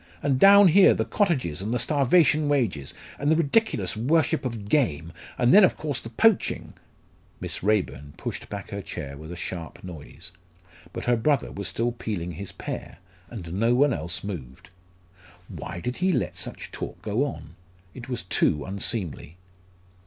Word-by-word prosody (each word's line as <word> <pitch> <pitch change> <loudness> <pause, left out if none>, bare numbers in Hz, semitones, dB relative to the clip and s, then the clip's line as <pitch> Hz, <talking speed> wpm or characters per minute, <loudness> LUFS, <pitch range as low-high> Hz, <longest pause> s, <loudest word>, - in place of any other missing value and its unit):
And 135 -2 +1
down 200 +1 +8
here, 190 +4 +6
the - - -1
cottages, 135 - 0
and 105 +3 -3
the 125 - +1
starvation 150 +3 +3
wages, 105 - 0 0.2
and 145 - 0
the - - +5
ridiculous 165 - +1
worship 145 +7 +1
of 115 -5 -4
game, 85 - +1 0.2
and 120 -1 +4
then, 205 +1 +9
of 185 - +4
course, 145 -5 -3
the 115 - -8
poaching 220 - +2 0.3
" - - -33
Miss - - -4
Raeburn 90 -9 -1
pushed - - -6
back 100 -1 -7
her 100 0 -4
chair 70 -6 -7
with 80 +3 -10
a - - -6
sharp 85 -1 -6
noise. 85 0 -9 0.6
But - - -6
her 120 - +3
brother 140 +5 +1
was 100 - -4
still 120 +1 0
peeling 100 -7 -4
his 95 +4 -7
pear, - - -7 0.3
and 90 -8 -7
no 115 +5 +2
one 140 +1 +4
else 85 -2 -3
moved. 80 -9 -8 0.8
Why 90 - -7
did 125 +7 -4
he 185 +1 +2
let - - -1
such - - -6
talk - - -6
go 110 +5 0
on? 145 - -6 0.4
It 125 0 -10
was 120 -5 -3
too 75 -4 +1
unseemly. 95 - -4
115 Hz, 170 wpm, -25 LUFS, 90-145 Hz, 0.8 s, then